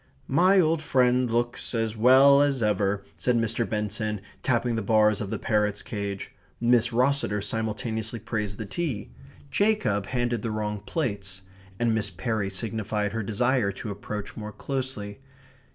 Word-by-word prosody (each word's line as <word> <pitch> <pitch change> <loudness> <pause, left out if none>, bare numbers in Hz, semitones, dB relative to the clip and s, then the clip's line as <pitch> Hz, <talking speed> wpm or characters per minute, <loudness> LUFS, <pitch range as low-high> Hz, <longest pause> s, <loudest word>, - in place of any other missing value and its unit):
"My 185 +7 +5
old 165 -2 +3
friend 125 -4 +2
looks 120 +1 -1
as 115 -1 -1
well 135 +5 +7
as 140 -4 +2
ever," 100 -1 +1 0.2
said 120 +6 +2
Mr. 115 0 0
Benson, 105 0 -2 0.2
tapping 120 -1 +1
the 110 - -1
bars 105 0 +3
of 100 - -4
the - - -2
parrot's 105 -3 0
cage; 100 -2 -5 0.3
Miss 120 0 +3
Rosseter 125 -3 +2
simultaneously 110 +2 -2
praised 105 -3 -3
the 110 - -5
tea; 125 - -3 0.4
Jacob 200 - +1
handed 120 -3 -1
the 115 - -2
wrong 105 -1 -2
plates; 100 - -3 0.3
and 115 0 +1
Miss 110 -2 0
Perry 100 +2 -2
signified 105 +1 -2
her 115 - -1
desire 115 +1 +1
to 105 +2 -6
approach 100 0 -6
more 105 -1 -6
closely. 130 -5 -4
110 Hz, 150 wpm, -26 LUFS, 105-125 Hz, 0.4 s, well